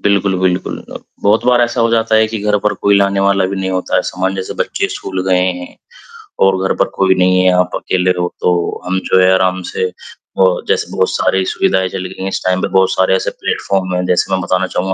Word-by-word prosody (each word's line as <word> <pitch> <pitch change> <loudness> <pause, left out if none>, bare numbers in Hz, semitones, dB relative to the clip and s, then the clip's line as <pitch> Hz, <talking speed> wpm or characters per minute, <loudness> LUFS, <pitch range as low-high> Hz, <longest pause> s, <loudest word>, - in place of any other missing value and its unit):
बिल्कुल, 100 -2 +1
बिल्कुल। 90 -1 -1 0.2
अब, - - -10 0.2
बहुत 105 +2 +2
बार 125 -1 +4
ऐसा 120 0 -1
हो 115 0 +2
जाता 115 -1 +1
है 110 0 +4
कि 110 -1 -4
घर 105 0 +1
पर 105 - 0
कोई 100 0 +2
लाने 100 0 +1
वाला 100 -1 +2
भी 100 +1 -4
नहीं 95 0 -2
होता 95 -1 -1
है, - - +2
सामान 95 +1 -2
जैसे 95 -1 -5
बच्चे - - -2
स्कूल 95 -1 -4
गए 90 -1 +3 0.2
हैं 90 - -10 0.7
और 95 -1 +3
घर - - 0
पर - - +2
कोई 95 -1 +3
नहीं 90 0 +3
है 95 - +4
आप 90 0 0
अकेले 90 0 0
रहो 90 -1 -2
तो 90 -1 0
हम 95 +1 -1
जो 95 - +5
है 90 0 +5
आराम 95 0 +1
से 95 - -1 0.5
अ, 95 - +6 0.2
जैसे - - -1
बहुत 95 - 0
सारी 95 0 0
सुविधाएँ 95 0 0
चल 95 0 -5
गई 95 - -10
हैं - - -2
इस - - -3
टाइम 95 0 +1
पे - - 0
बहुत 95 0 +3
सारे 95 0 +2
ऐसे - - -1
प्लेटफॉर्म 95 -1 -2
हैं 90 - -1
जैसे 90 +2 0
मैं 95 - +1
बताना 95 +1 0
चाहूँगा 95 +1 -2
95 Hz, 240 wpm, -15 LUFS, 95-100 Hz, 0.7 s, अ